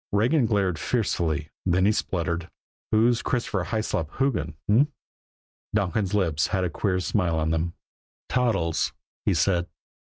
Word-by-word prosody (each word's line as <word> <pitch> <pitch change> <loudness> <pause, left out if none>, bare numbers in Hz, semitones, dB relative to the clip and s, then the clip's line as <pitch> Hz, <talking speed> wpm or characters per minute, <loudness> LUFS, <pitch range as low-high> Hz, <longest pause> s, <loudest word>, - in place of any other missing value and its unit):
Regan 120 +6 +3
glared 95 -7 +1
fiercely 85 -10 0
then 95 +1 +2
he 105 - +5
spluttered: 85 -4 -2 0.4
"Who's 115 +2 +3
Christopher 105 -7 -1
Hyslop 110 -8 -1
Hoogan 120 - 0
h'm?" 135 +9 +4 0.8
Donkin's 100 0 0
lips 80 -6 +2
had 95 -2 0
a 90 - -1
queer 95 +2 0
smile 90 -3 0
on 80 0 0
them. 80 +1 -1 0.5
"Toddles," 100 -10 +1 0.3
he - - +4
said. 90 -2 +2
95 Hz, 130 wpm, -26 LUFS, 85-110 Hz, 0.8 s, he